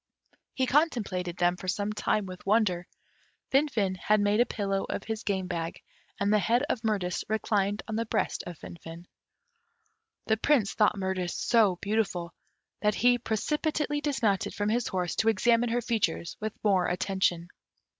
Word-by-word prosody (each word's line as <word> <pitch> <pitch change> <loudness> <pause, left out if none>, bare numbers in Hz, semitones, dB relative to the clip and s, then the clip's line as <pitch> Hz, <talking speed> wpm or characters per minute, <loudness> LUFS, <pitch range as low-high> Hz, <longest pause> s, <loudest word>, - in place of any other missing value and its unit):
He 260 - +1
contemplated 210 - 0
them 175 0 +2
for 185 - -8
some 205 +3 -1
time 210 -1 0
with 185 -1 -9
wonder. 195 -4 +1 0.6
Finfin 265 -9 +2
had 210 +3 +2
made 205 +1 +2
a 240 - +4
pillow 195 -2 -1
of - - -3
his 220 -1 -4
game 190 -3 -1
bag, 170 -2 -4 0.4
and 200 +1 +2
the 210 - +5
head 235 +7 +2
of 230 - -1
Mirtis 200 -6 -1
reclined 205 -2 0
on 220 -1 -3
the 230 0 -1
breast - - -1
of 175 -2 -7
Finfin. 165 +1 -10 1.2
The 220 - +2
Prince 230 -4 +2
thought 210 -1 +3
Mirtis 190 -2 -2
so 215 -6 +3
beautiful, 200 -5 -1 0.5
that 210 -1 +2
he 245 0 +4
precipitately 295 +6 -1
dismounted 230 -10 0
from 205 0 0
his 235 +1 0
horse 180 -2 -2
to 220 - +3
examine 230 +3 +3
her 240 +1 0
features 205 -8 -1
with 215 0 -3
more 195 -4 +3
attention. 180 -1 0
205 Hz, 160 wpm, -28 LUFS, 185-230 Hz, 1.2 s, the